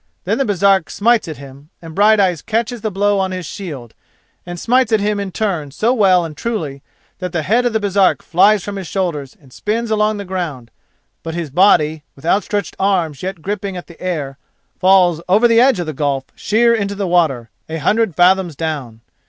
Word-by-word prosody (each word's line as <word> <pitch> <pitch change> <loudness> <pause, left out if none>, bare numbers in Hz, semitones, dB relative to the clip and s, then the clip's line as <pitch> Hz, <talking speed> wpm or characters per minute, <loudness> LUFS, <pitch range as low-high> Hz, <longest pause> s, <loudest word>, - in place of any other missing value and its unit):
Then - - -1
the 275 - +1
Baresark 195 -3 +2
smites 230 -1 +2
at 155 - -6
him 140 +2 -13
and 165 -1 -10
Brighteyes 200 -4 +3
catches 230 +1 -2
the 215 - -1
blow 205 +1 +1
on 190 -1 0
his 185 -1 -5
shield, 145 - -8 0.5
and 175 0 -6
smites 250 +2 +2
at 220 - +3
him 205 0 -1
in 200 -1 -4
turn 180 -8 -2
so 220 - 0
well 190 -7 +3
and 155 -2 -8
truly, 155 -9 -4 0.4
that 180 -2 -5
the 160 -3 -1
head 235 +9 +2
of 240 - -3
the 220 - +1
Baresark 200 -2 +2
flies 195 +3 +3
from 205 -1 -5
his 190 -3 -6
shoulders 155 -9 -3
and 135 -4 -20
spins 225 +2 -2
along 215 0 +1
the 200 - -6
ground, 165 -11 -5 0.5
but 165 0 -6
his 165 -5 -4
body, 160 -3 +3
with 140 - -15
outstretched 205 +3 0
arms 175 -8 0
yet 185 -3 -5
gripping 200 -1 -4
at 175 - -8
the 170 - -16
air, 145 -7 -4 0.4
falls 185 -3 +4
over 215 +6 +5
the 230 0 +4
edge 255 -5 +4
of 175 - -2
the 155 - -4
gulf 140 -1 -1
sheer 235 +2 +2
into 200 -3 -1
the 200 0 -2
water, 155 -10 +1 0.2
a 160 - -3
hundred 205 +4 +1
fathoms 180 -2 +3
down. 135 -8 -5
185 Hz, 200 wpm, -17 LUFS, 160-210 Hz, 0.5 s, over